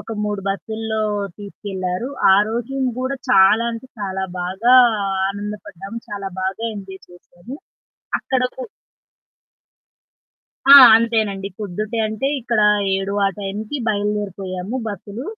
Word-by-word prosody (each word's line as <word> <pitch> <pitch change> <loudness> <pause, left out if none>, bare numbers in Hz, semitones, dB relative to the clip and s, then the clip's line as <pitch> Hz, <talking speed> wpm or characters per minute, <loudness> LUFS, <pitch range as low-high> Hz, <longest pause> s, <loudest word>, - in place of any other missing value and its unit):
ఒక 225 - -8
3 205 -1 -2
బస్సుల్లో 220 +2 -3 0.4
తీసుకెళ్లారు. 195 0 -5 0.3
ఆరోజున 235 +6 0
గూడా 260 +2 -2
చాలా 195 +4 +5
అంటే 230 +3 -8
చాలా 190 -1 -3 0.2
బాగా 190 +8 +2 0.5
ఆనందపడ్డాం. 205 -1 -7
చాలా 200 -1 -5
బాగా 190 +4 -3
ఎంజాయ్ 190 -2 -9
చేసాము. 175 +7 -12 0.6
అక్కడకు 260 - -2 2.1
ఆ! - - +13 0.2
అంతేనండి 220 -4 0
పొద్దుటే 210 +3 -4
అంటే 220 +4 -3
ఇక్కడ 235 -2 0 0.4
7 195 +1 -3
ఆ - - +3
టైంకి 210 +6 -4
బయలుదేరిపోయాము 205 -1 -3
బస్సులు. 205 +4 -7
205 Hz, 100 wpm, -20 LUFS, 195-225 Hz, 2.1 s, ఆ